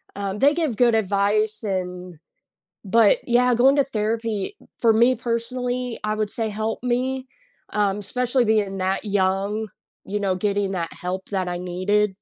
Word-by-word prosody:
um, 200 0 -3
they 285 +3 +5
give 310 -9 -1
good 240 -2 +4
advice, 210 +1 +1
and, 180 -4 -4 0.7
but 215 +1 +5
yeah, 245 +1 +4
going 265 +4 +5
to 280 - +5
therapy, 225 - -2 0.2
for 225 -2 +4
me 240 +3 +5
personally, 245 +1 -3
I 215 0 0
would 215 -1 -1
say 225 0 -2
helped 220 +3 -3
me, 255 +2 -1 0.5
um, 205 -1 +1
especially 245 +4 0
being 205 -3 +1
that 190 +2 -1
young, 200 +2 0 0.4
you 205 +1 -2
know, 190 -2 +1
getting 200 0 0
that 170 -3 -3
help 185 +1 -5
that 185 -2 -1
I 175 - -3
needed. 185 +4 +1
215 Hz, 155 wpm, -23 LUFS, 195-240 Hz, 0.7 s, they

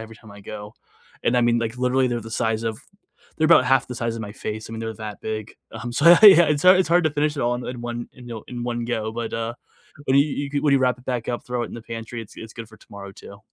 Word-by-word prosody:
every 115 0 -10
time 110 -1 -16
I 100 - -12
go, 105 +1 -9 0.5
and 125 - +2
I 125 - +4
mean, 120 0 +3
like, 115 +1 -3
literally 125 +1 +2
they're 120 -1 -2
the 110 0 -10
size 110 0 -1
of 110 -1 -3 0.6
they're 155 -1 +2
about 165 -6 +6
half 130 0 +2
the 125 - -6
size 115 -1 -2
of 115 - -5
my 105 - -7
face, 110 +1 -6
I - - -8
mean, 115 - -6
they're 110 0 -4
that 105 -1 -8
big, 110 -1 -5 0.2
um, 120 0 -6
so, 140 +5 -1
yeah 170 0 +9
yeah, 195 -5 +10
it's 150 -1 0
hard 185 0 +7
it's 185 - +1
hard 175 +1 +4
to 155 - +2
finish 150 +1 -1
it - - -2
all 120 +1 +1
in 125 - -7
in 125 -1 -6
one 120 0 -5
in 125 -1 -13
yo 115 -2 -7
in 120 -1 -6
one 120 -1 -3
go, 110 -2 -2
but, 115 0 -5
uh, 115 +1 -3 0.5
when 130 0 +2
you 140 - +6
you 140 -1 -4
could 145 0 -1
when 145 - +3
you 140 - +5
wrap 125 -1 +1
it 125 - -18
back 125 -3 -3
up, 120 - -3
throw 125 -1 -3
it - - -5
in - - -10
the 115 - -8
pantry, 115 +1 -7
it's 110 - -15
it's 110 0 -9
good 115 -2 -9
for 110 - -16
tomorrow 100 -1 -11
too. 100 -1 -13
120 Hz, 305 wpm, -23 LUFS, 110-130 Hz, 0.6 s, yeah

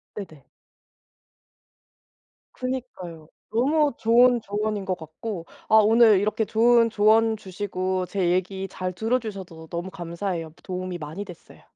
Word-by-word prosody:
네네. 160 -9 -9 2.1
그니까요. 240 -11 -6 0.2
너무 285 +5 +2
좋은 240 +1 +4
조언인 210 0 -2
것 185 - -1
같고 165 +3 -7 0.2
아 - - +5
오늘 220 -1 +6
이렇게 215 +2 0
좋은 230 +2 +4
조언 220 +1 +3
주시고 185 -1 -3
제 180 -1 0
얘기 190 +1 -1
잘 185 0 -4
들어주셔서 195 -7 -3
너무 175 +2 -4
감사해요. 170 -2 -4
도움이 185 -1 -4
많이 160 +5 -6
됐어요. 180 -4 -14
200 Hz, 265 characters per minute, -24 LUFS, 180-225 Hz, 2.1 s, 오늘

